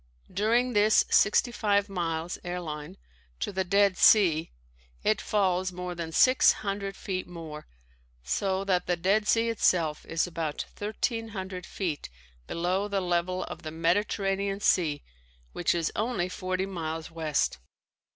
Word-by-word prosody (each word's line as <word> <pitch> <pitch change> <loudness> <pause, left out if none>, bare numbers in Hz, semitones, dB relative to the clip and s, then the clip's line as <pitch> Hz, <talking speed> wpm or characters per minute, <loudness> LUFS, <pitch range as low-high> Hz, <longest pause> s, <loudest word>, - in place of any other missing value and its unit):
During 235 +6 +2
this 210 0 +4
sixty 225 +4 +4
five 205 -3 +1
miles 170 -3 -3
(airline) 175 -1 -5 0.4
to - - -2
the 190 -1 -1
Dead 200 0 +3
Sea, 170 -7 +5 0.5
it 215 -2 +2
falls 185 -3 +1
more 180 0 -5
than 170 -2 -5
six 255 +10 +5
hundred 200 0 -3
feet 185 -2 -4
more, 160 -4 -9 0.6
so 190 - -1
that 185 -2 0
the 175 0 +1
Dead 200 +5 +1
Sea 230 0 +3
itself 170 -8 +1
is 165 -1 0
about 160 -4 -3
thirteen 225 +2 -2
hundred 190 -3 -6
feet 170 -7 -4 0.4
below 180 +4 -1
the 200 -1 -1
level 180 0 0
of - - -8
the 155 - -6
Mediterranean 195 +4 0
Sea 160 -7 +2 0.5
which 175 - 0
is 165 -2 0
only 210 -5 -1
forty 185 +1 -2
miles 165 -4 -5
west. 155 - -1
185 Hz, 140 wpm, -28 LUFS, 170-200 Hz, 0.6 s, Sea